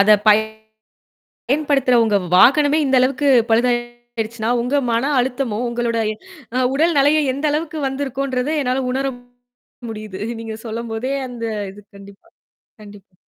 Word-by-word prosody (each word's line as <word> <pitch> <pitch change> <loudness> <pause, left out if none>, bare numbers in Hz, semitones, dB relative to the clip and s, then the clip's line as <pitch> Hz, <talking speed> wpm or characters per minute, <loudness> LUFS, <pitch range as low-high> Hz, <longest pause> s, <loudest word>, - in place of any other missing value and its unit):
அதை, 210 +2 +6
பய் 210 +1 +6 1.1
பயன்படுத்துறவங்க 260 -7 +2 0.2
வாகனமே 290 +9 +5
இந்த 265 -1 +2
அளவுக்கு 270 +3 +1 0.2
பழுதாயிடுச்சுன்னா, 240 -1 -1
உங்க 250 +4 0
மன 235 +5 0
அழுத்தமும், 250 -3 -2
உங்களோட, 235 -1 -2 0.6
அ, - - +1 0.2
உடல் 325 +4 +2
நலையும் 290 +1 +3
எந்த 280 +3 -6
அளவுக்கு 315 +1 -3
வந்திருக்கும்ன்றதை 270 +1 -2
என்னால 255 0 -1
உணர 270 +1 -1 0.8
முடியுது. 215 -3 -8 0.2
நீங்க 225 -1 -6
சொல்லும் 230 +1 -5
போதே 245 +5 -3 0.2
அந்த 240 -2 -7 0.3
இது. 205 - -14 0.2
கண்டிப்பா 200 0 -15 0.5
கண்டிப்பா. 205 -2 -15
245 Hz, 120 wpm, -19 LUFS, 225-275 Hz, 1.1 s, அதை